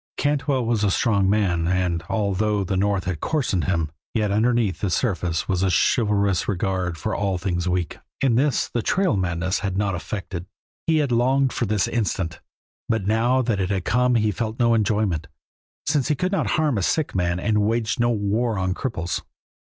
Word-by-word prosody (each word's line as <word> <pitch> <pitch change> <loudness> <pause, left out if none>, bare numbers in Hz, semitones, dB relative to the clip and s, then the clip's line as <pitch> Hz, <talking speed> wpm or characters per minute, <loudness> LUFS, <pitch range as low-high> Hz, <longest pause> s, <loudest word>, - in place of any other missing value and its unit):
Cantwell 140 -3 0
was 115 -2 +1
a 100 - +3
strong 100 -2 +2
man, 90 -5 +1
and, 90 -2 0
although 105 0 0
the 95 +1 -2
North 100 0 +1
had 90 -4 -3
coarsened 125 - 0
him, 80 -4 0 0.2
yet 105 -3 +1
underneath 110 -3 +1
the 100 - -1
surface 90 -4 -1
was 95 -2 0
a 95 - +2
chivalrous 100 - +2
regard 90 -3 -1
for - - -3
all 100 -2 0
things 90 -1 -1
weak, 90 -3 -2 0.2
and 130 -4 +2
this 140 +3 +2
the 120 - -2
trail 185 - +1
madness 90 0 -1
had 95 -2 -2
not 100 -1 0
affected. 95 -1 -5 0.4
He 160 -1 +3
had 145 -4 +1
longed 130 +3 +2
for 120 - -1
this 105 -2 +1
instant, 95 -6 -2 0.5
but 110 -4 0
now 120 +5 +2
that 115 -4 0
it 95 -1 0
had 95 -3 -1
come 125 +2 +2
he 110 -2 +2
felt 110 +1 -3
no 120 -2 +3
enjoyment, 105 -6 0 0.6
since 145 -3 +1
he 150 - +2
could 180 +6 -1
not 195 - 0
harm 150 -8 +1
a - - -1
sick 155 - 0
man 90 -1 0
and 105 +2 +1
waged 115 +3 0
no 120 0 +3
war 110 +1 0
on 95 0 0
cripples. 85 -7 -3
105 Hz, 190 wpm, -23 LUFS, 95-120 Hz, 0.6 s, a